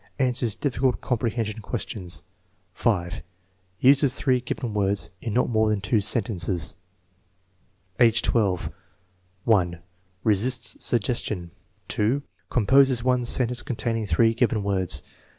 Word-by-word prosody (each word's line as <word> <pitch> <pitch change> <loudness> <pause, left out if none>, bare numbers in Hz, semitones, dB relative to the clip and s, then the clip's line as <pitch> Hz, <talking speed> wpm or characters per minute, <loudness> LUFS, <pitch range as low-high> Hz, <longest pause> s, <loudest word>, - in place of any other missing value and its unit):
Answers 125 -4 0
difficult 130 -2 0
"comprehension 115 -3 -2
questions/* 100 -5 -3 0.5
fl. 100 -5 +1 0.8
Uses 140 0 +5
three 130 -3 +1
given 120 -2 -4
words 100 -1 0
m 115 - -4
not 125 - +2
more 110 -2 +2
than 105 -1 +1
two 100 +3 0
scnte.ncoa* 95 - 0 1.3
Afffi 110 -5 +3
M: - - -6 1.0
I. - - -18 0.4
Resist 115 +3 0
suggestion., 105 -6 -1 1.0
Composes 130 +1 +3
otic 125 -1 +1
.sentence 125 -1 +2
containing 115 -3 -3
three 115 +6 +3
given 115 -3 +1
words. 95 -7 +2
115 Hz, 105 wpm, -25 LUFS, 100-125 Hz, 1.3 s, Uses